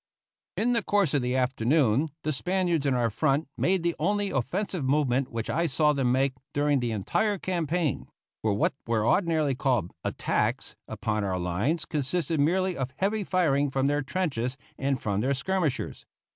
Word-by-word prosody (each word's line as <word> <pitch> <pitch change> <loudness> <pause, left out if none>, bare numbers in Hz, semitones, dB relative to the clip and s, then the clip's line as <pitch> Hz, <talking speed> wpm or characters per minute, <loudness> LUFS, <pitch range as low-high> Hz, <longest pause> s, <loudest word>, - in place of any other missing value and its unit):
In 240 +3 +2
the 235 -1 +2
course 200 -7 +1
of 145 - +2
the 125 +1 -1
afternoon 130 +2 +2
the 155 - 0
Spaniards 175 0 0
in 135 - +2
our 120 -2 +1
front 140 +4 +1
made 185 -1 +1
the 170 0 +1
only 205 +4 0
offensive 170 - -2
movement 135 -1 +1
which 115 -1 -3
I 170 +2 +1
saw 150 +1 +3
them 135 -4 +1
make 135 +1 +2 0.2
during 145 -1 +2
the 120 -1 -1
entire 200 - 0
campaign; 170 -4 -1 0.3
for 105 -2 +1
what 105 - +1
were 110 -2 +1
ordinarily 160 -6 +2
called 125 - 0
"attacks" - - -1
upon 105 -2 -2
our 95 -2 -1
lines 100 - -1
consisted 155 +2 -1
merely 185 +5 +2
of 130 -1 -3
heavy 205 +5 0
firing 150 -7 +2
from 135 0 0
their 145 +1 +2
trenches 135 -5 -2 0.2
and 135 -1 -1
from 100 -2 -1
their 135 +4 +1
skirmishers. 160 -1 -2
145 Hz, 170 wpm, -27 LUFS, 125-170 Hz, 0.3 s, saw